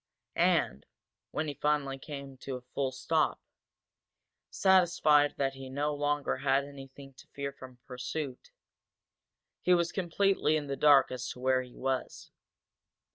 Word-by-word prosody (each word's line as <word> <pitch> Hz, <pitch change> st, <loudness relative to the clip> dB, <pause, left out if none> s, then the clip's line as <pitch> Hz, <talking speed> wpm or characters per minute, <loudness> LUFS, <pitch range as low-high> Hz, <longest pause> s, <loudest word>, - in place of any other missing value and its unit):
And, 65 Hz, +2 st, +1 dB, 0.4 s
when 155 Hz, -, -2 dB
he 145 Hz, -, -3 dB
finally 145 Hz, -2 st, 0 dB
came 140 Hz, -1 st, -8 dB
to 130 Hz, 0 st, -6 dB
a 125 Hz, -, -7 dB
full 130 Hz, +2 st, -3 dB
stop, 155 Hz, +4 st, 0 dB, 1.1 s
satisfied 175 Hz, -6 st, +4 dB
that 135 Hz, -1 st, 0 dB
he 135 Hz, -1 st, -9 dB
no 145 Hz, +3 st, -1 dB
longer 145 Hz, -1 st, -1 dB
had 135 Hz, +1 st, +2 dB
anything 135 Hz, -1 st, -12 dB
to -, -, -17 dB
fear 140 Hz, 0 st, -5 dB
from 130 Hz, -2 st, -12 dB
pursuit, 130 Hz, +1 st, -5 dB, 1.1 s
he 180 Hz, -, +4 dB
was 170 Hz, -1 st, +1 dB
completely 190 Hz, -3 st, +1 dB
in 150 Hz, -, -4 dB
the 140 Hz, -1 st, -3 dB
dark 145 Hz, -1 st, +5 dB
as 125 Hz, 0 st, -4 dB
to -, -, -8 dB
where 130 Hz, 0 st, +2 dB
he 125 Hz, -1 st, -12 dB
was. 130 Hz, 0 st, -3 dB
140 Hz, 140 wpm, -30 LUFS, 130-150 Hz, 1.1 s, dark